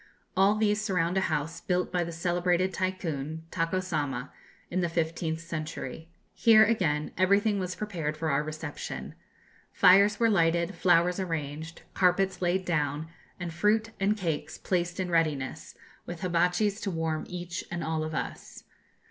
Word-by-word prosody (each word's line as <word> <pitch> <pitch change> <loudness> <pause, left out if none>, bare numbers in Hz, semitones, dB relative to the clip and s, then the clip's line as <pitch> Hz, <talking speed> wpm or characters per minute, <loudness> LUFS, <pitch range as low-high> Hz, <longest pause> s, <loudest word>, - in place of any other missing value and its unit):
All 195 +2 +4
these 210 -1 +2
surround 180 -4 0
a - - +3
house 155 +1 -2
built 180 0 0
by 180 -1 +1
the 170 - -5
celebrated 175 +2 +1
Tycoon, 160 -5 -3
Tako 165 +2 0
Sama, 145 -7 -3 0.4
in 185 +1 0
the 175 - 0
fifteenth 165 0 -1
century. 165 0 -6 0.2
Here, 220 -2 +6
again, 160 -9 0
everything 200 +2 +3
was 185 -1 -3
prepared 165 -8 -3
for 160 -1 -1
our 140 +1 +2
reception. 155 0 -6 0.6
Fires 200 +3 +6
were 230 - +4
lighted, 170 -2 +2
flowers 175 0 +3
arranged, 160 -2 -4
carpets 185 0 +2
laid 185 +1 +1
down, 150 -2 -1 0.3
and 175 -2 -4
fruit 215 +5 +2
and 200 +2 +2
cakes 165 -6 -3
placed 175 -1 -1
in 180 -1 -2
readiness, 155 -6 -1 0.3
with 175 0 -6
hibatchis 180 +4 +1
to 200 - -2
warm 160 -3 -2
each 175 0 -5
and 175 -1 -3
all 160 0 -1
of 155 0 -4
us. - - -5
175 Hz, 150 wpm, -28 LUFS, 160-185 Hz, 0.6 s, Here